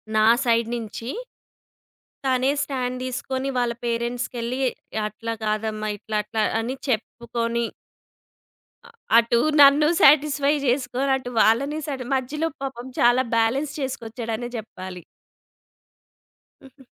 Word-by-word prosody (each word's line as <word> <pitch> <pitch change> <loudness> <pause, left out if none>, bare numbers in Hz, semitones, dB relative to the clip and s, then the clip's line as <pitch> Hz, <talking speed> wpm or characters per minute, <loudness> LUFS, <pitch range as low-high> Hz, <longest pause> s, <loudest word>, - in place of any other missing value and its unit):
నా 215 0 +5 0.2
సైడ్ 230 -1 +3
నుంచి 230 +1 -6 1.2
తనే 260 +1 +2
స్టాండ్ 255 -2 -3
తీసుకొని, 260 +1 -3
వాళ్ళ 240 -1 +1
పేరెంట్స్‌కిళ్లి 240 +1 -2 0.5
అట్లా 230 +2 -5
కాదమ్మా 215 0 -1
ఇట్లా, 215 +1 -3
అట్లా 215 +1 -1 0.2
అని 245 +4 -3
చెప్పుకొని 235 0 -2 1.2
అ - - -14 0.3
అటు 235 0 +4 0.2
నన్ను 285 +2 +7
సాటిస్ఫై 285 0 +5
చేసుకొని, 255 +1 0
అటు 255 -2 -7
వాళ్ళని 275 +8 +3
సాట్ 270 -3 -3
మధ్యలో 300 +5 -1
పాపం 265 -2 -5 0.2
చాలా 245 +2 +5
బాలన్స్ 260 +6 +1
చేసుకొచ్చాడనే 240 -3 -4
చెప్పాలి. 185 -4 -8 1.6
హుహు. 265 -1 -18
245 Hz, 100 wpm, -24 LUFS, 230-265 Hz, 1.6 s, నన్ను